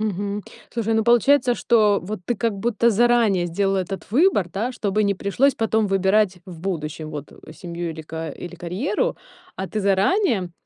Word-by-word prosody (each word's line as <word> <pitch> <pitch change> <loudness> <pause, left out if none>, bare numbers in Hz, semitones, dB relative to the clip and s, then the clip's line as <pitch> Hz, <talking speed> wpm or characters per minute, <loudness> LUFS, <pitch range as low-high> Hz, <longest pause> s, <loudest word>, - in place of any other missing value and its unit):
Мгм. 205 -1 -2 0.3
Слушай, 225 -1 -1
ну 220 -1 +2
получается, 245 +2 +4
что, 215 -5 +3
вот, 205 +1 -5
ты, 240 - 0
как 225 -1 -1
будто, 235 +1 +1
заранее 230 -4 +3
сделала 195 +3 0
этот 190 0 -5
выбор, 255 - +3
да, 220 +8 -3
чтобы 210 -3 0
не 200 - +2
пришлось 235 +9 +1
потом 220 -1 +1
выбирать 195 0 +2
в 175 -3 -10
будущем, 155 -4 -4
вот, 145 -1 -7
э, 155 - -14
семью 170 -1 -5
или 160 - -7
ка 160 0 -6
или 175 +4 -8
карьеру. 220 - -2 0.4
А 190 - -4
ты 215 - -3
заранее 200 - +1
200 Hz, 175 wpm, -22 LUFS, 180-230 Hz, 0.4 s, получается